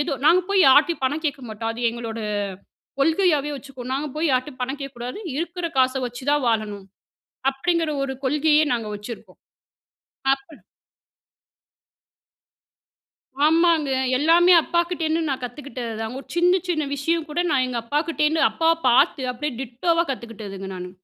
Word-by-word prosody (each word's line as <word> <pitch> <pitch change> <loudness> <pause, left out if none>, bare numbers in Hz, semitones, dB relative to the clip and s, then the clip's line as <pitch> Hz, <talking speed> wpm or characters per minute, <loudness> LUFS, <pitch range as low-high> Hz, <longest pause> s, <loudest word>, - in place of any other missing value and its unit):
ஏதோ 295 0 -1
நாங்க 350 +3 +6
போய் 395 -1 +4
யார்ட்டயும் 295 +4 +5
பணம் 295 +5 -1
கேட்க 285 -2 -1
மாட்டோம் 225 +1 -4
அது 240 +1 -7
எங்களோட 230 -1 -6 0.8
கொள்கையாகவே 315 -2 +2
வச்சுக்குவோம். 260 -2 -8
நாங்க 290 +2 -2
போய் 320 0 +1
யார்கிட்டயும் 255 +1 -1
பணம் 265 +3 -4
கேட்கக்கூடாது. 250 - -6 0.2
இருக்கிற 345 +1 -3
காச 255 0 +4
வச்சு 245 +1 -7
தான் 290 -3 +1
வாழணும். 210 -3 -1 0.7
அப்படிங்கிற 330 +3 0
ஒரு 270 -1 -2
கொள்கையே 300 +2 +3
நாங்க 230 -2 -3
வச்சிருப்போம். 215 +3 -10 1.0
அப்ப 270 0 -7 3.0
ஆமாங்க 325 -2 +3 0.3
எல்லாமே 340 +4 +5
அப்பாக்கிட்டேருந்து 335 -1 0
நான் 265 -2 -3
கத்துக்கிட்டதுதான். 240 -3 -5
ஒரு 275 - -11
சின்ன 355 +1 +4 0.2
சின்ன 310 -4 0
விஷயம் 325 +3 -1
கூட 305 +4 -1
நான் 270 -4 +2
எங்க 250 -2 -3
அப்பாக்கிட்டேருந்து, 300 +4 0
அப்பாவ 325 0 +2 0.2
பார்த்து 265 +3 +4
அப்படியே 290 +4 -4
டிட்டோவா 330 +8 0
கத்துக்கிட்டதுங்க 205 -6 -7
நானு. 180 0 -7
280 Hz, 130 wpm, -23 LUFS, 245-325 Hz, 3.0 s, நாங்க